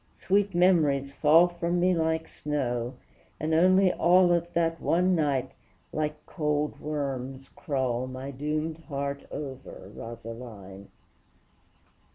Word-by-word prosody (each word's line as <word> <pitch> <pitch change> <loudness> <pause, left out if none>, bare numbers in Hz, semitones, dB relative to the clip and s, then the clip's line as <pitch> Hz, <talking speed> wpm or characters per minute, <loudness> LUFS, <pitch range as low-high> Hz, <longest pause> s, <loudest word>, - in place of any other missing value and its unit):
sweet 200 0 +1
memories 150 -7 +3
fall 160 +4 +6
From 175 0 -2
me 180 +1 +3
like 160 -1 0
snow, 125 -4 -3 0.4
and 155 +1 -1
only 185 +3 +5
all 175 +1 +5
Of 170 0 0
that 165 -1 0
one 180 +2 +2
night, 145 -6 0 0.4
like 150 0 -3
cold 150 -2 -1
worms 135 -3 -4
crawl 130 -3 -2
My 130 +2 -6
doomed 155 +3 -2
heart 140 -1 -4
over, 130 -8 -8
Rosaline! 115 -4 -9
150 Hz, 115 wpm, -27 LUFS, 130-170 Hz, 0.4 s, fall